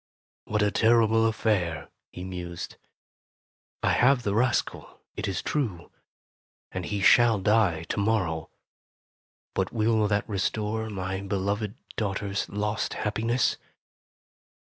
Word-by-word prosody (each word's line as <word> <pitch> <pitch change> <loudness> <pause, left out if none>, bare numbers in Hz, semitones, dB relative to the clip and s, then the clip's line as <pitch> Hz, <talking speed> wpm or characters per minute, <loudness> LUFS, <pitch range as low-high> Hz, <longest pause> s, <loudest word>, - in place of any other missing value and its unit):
"What 105 0 0
a 105 - +2
terrible 115 0 +4
affair!" 105 -7 -1 0.2
he 90 - -8
mused. 90 -2 -6 1.1
"I - - +3
have 125 +1 +4
the 100 - 0
rascal, 120 +2 0 0.2
it - - -3
is 95 -3 -2
true, 105 - -2 0.8
and 95 -2 -4
he 100 -2 -2
shall 120 0 +6
die 100 -5 +2
to 85 - -3
morrow. 95 -7 0 1.0
But 95 -1 -1
will 110 -1 +2
that 105 0 0
restore 110 +2 -1
my 95 -1 -3
be 100 0 -3
loved 100 +2 -1 0.2
daughter's 100 -1 -2
lost 105 +1 -2
happiness?" 115 +4 0
105 Hz, 120 wpm, -27 LUFS, 95-110 Hz, 1.1 s, shall